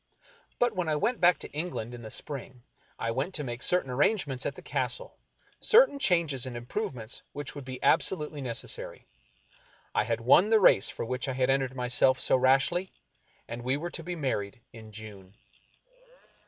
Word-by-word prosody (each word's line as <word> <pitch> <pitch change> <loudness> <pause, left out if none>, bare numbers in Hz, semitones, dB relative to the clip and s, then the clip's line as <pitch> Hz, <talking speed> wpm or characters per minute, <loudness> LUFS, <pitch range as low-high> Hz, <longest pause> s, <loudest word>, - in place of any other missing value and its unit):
But 240 -3 +1
when 180 -3 -1
I 155 - +1
went 230 +10 0
back 175 0 +6
to - - -7
England 150 -7 -4
in 120 - -8
the 110 - -8
spring, 130 -2 -7 0.3
I 115 - -2
went 135 +10 -2
to 150 - +1
make 120 -2 -5
certain 180 -8 +1
arrangements 140 - +1
at - - -4
the - - -11
Castle - - -3 0.2
— - - -34
certain 460 - +5
changes 165 - +2
and 120 -2 -5
improvements 120 - -4
which 145 -1 -6
would 145 -3 -8
be 130 0 -6
abso 190 - +3
lutely 150 -2 -6
necessary. 120 -3 -3 0.9
I - - +1
had 115 -1 -1
won 155 - +5
the 220 -1 +5
race 140 - +5
for - - -5
which 125 +3 -3
I 135 - -1
had 130 0 +2
entered 135 -1 0
myself 125 +1 +2
so - - +3
rashly, 135 +8 +2 0.6
and 120 +1 -6
we 130 +3 0
were 170 +3 -5
to - - -6
be 175 +2 -5
married 130 -7 -3
in 110 -1 -12
June. 105 -2 -10
135 Hz, 185 wpm, -29 LUFS, 120-175 Hz, 0.9 s, back